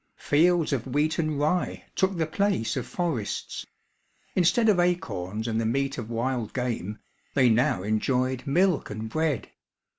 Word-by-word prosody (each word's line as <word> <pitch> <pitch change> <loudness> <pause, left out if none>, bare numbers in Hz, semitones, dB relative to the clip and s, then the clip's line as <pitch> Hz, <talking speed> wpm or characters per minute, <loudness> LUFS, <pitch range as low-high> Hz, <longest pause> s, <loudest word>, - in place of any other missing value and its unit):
Fields 165 +1 +3
of 130 -2 -2
wheat 150 +5 0
and 155 -3 0
rye 155 +5 0
took 190 -1 +1
the 160 - +1
place 180 - 0
of - - -3
forests. 160 - -3 0.7
Instead 220 +6 +3
of 205 -4 +4
acorns 115 - -1
and 115 0 0
the - - -1
meat 135 +3 0
of 115 -1 -6
wild 120 -1 -2
game, 115 -5 -2 0.4
they 130 -3 +5
now 115 -4 +2
enjoyed 125 +5 0
milk 175 +3 +2
and 110 +1 -5
bread. 155 -3 -1
135 Hz, 150 wpm, -26 LUFS, 115-165 Hz, 0.7 s, they